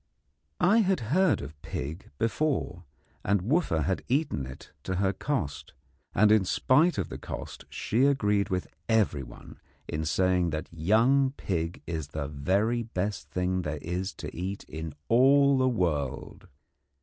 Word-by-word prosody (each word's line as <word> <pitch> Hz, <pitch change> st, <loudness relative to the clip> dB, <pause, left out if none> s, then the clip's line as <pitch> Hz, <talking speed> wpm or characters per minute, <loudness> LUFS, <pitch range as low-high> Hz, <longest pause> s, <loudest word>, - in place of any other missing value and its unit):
I 200 Hz, +4 st, +5 dB
had 195 Hz, -3 st, +2 dB
heard 185 Hz, -, +3 dB
of 75 Hz, +1 st, -10 dB
pig 80 Hz, +7 st, -6 dB
before, 115 Hz, -, -1 dB, 0.4 s
and 100 Hz, -2 st, +1 dB
Wooffa 115 Hz, -, +1 dB
had 95 Hz, +2 st, -1 dB
eaten 130 Hz, -, 0 dB
it 65 Hz, -, -11 dB
to 95 Hz, +5 st, -3 dB
her 95 Hz, +1 st, +1 dB
cost; 95 Hz, -, -3 dB, 0.4 s
and 105 Hz, +2 st, +5 dB
in 110 Hz, -2 st, +5 dB
spite 150 Hz, -, +3 dB
of 95 Hz, -, -2 dB
the -, -, -7 dB
cost -, -, -7 dB
she 120 Hz, +5 st, +1 dB
agreed 105 Hz, -8 st, +2 dB
with 90 Hz, -1 st, -1 dB, 0.2 s
everyone 75 Hz, -, -1 dB, 0.3 s
in 75 Hz, +1 st, -3 dB
saying 90 Hz, +2 st, +2 dB
that 80 Hz, +1 st, -5 dB
young 115 Hz, -, +3 dB
pig 85 Hz, -2 st, -3 dB
is 80 Hz, -4 st, -4 dB
the 75 Hz, -1 st, -4 dB
very 95 Hz, -, 0 dB
best 105 Hz, -2 st, -3 dB
thing 90 Hz, 0 st, 0 dB
there 75 Hz, -2 st, -3 dB
is 90 Hz, +3 st, -2 dB
to -, -, -7 dB
eat 95 Hz, +3 st, -4 dB
in 80 Hz, -1 st, -7 dB
all 135 Hz, +3 st, +5 dB
the 130 Hz, 0 st, +3 dB
world. 75 Hz, -, -2 dB
95 Hz, 150 wpm, -28 LUFS, 80-125 Hz, 0.4 s, I